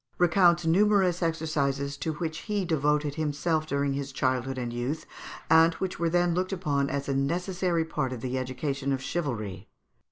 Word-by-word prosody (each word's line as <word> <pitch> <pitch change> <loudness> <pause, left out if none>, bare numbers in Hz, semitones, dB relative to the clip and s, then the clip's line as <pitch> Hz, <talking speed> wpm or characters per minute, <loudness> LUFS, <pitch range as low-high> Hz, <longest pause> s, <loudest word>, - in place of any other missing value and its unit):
recounts 175 -1 +4
numerous 185 0 +3
exercises 145 -4 -1
to 160 +2 -3
which 160 0 -4
he 205 -3 -2
devoted 150 -2 +1
himself 155 +1 -1
during 140 -1 0
his 140 0 -4
childhood 130 0 -1
and 120 -2 -3
youth, 125 +6 -3 0.4
and 165 +1 +5
which 190 -1 -4
were 170 -1 +1
then 175 0 +2
looked 185 +2 -1
upon 145 -7 0
as 140 0 -3
a 140 - 0
necessary 170 +4 0
part 150 -5 -2
of 125 -3 -5
the 130 +1 -3
education 135 +2 -2
of 135 - 0
chivalry. 110 - -3
155 Hz, 165 wpm, -28 LUFS, 135-170 Hz, 0.4 s, and